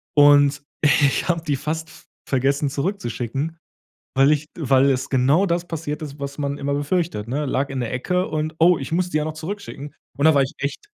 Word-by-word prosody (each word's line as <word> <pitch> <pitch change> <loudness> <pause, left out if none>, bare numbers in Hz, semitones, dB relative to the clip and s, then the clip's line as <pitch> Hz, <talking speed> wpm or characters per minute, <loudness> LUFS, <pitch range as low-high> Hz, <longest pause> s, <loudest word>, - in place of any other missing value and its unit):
und 145 0 +5 0.2
ich 145 +2 +3
habe 165 -1 0
die 145 -3 0
fast 160 +3 -4
v - - -16 0.2
vergessen, 140 +2 +1
zurückzuschicken, 140 - -3 0.6
weil 135 +2 +5
ich 150 0 0
weil 135 -2 +3
es 130 -1 -1
genau 140 +8 +3
das 175 -1 -1
passiert 155 -2 -4
ist, 145 -1 -7
was 140 0 -5
man 140 -1 -2
immer 140 0 -2
befürchtet, 145 - -1
ne? 145 +3 -1
Lag 135 +1 -1
in 135 -1 -4
der 120 -1 -3
Ecke 180 +8 0
und, 155 0 -3
„oh, 170 +1 +5
ich 135 - -6
muss 180 +2 0
die 155 - 0
ja 150 - 0
noch 155 0 -4
zurückschicken“. 155 -4 -7 0.2
Und 140 - +1
da 160 - +7
war 140 - +4
ich 135 - -5
echt 140 - -4
145 Hz, 210 wpm, -22 LUFS, 140-160 Hz, 0.6 s, da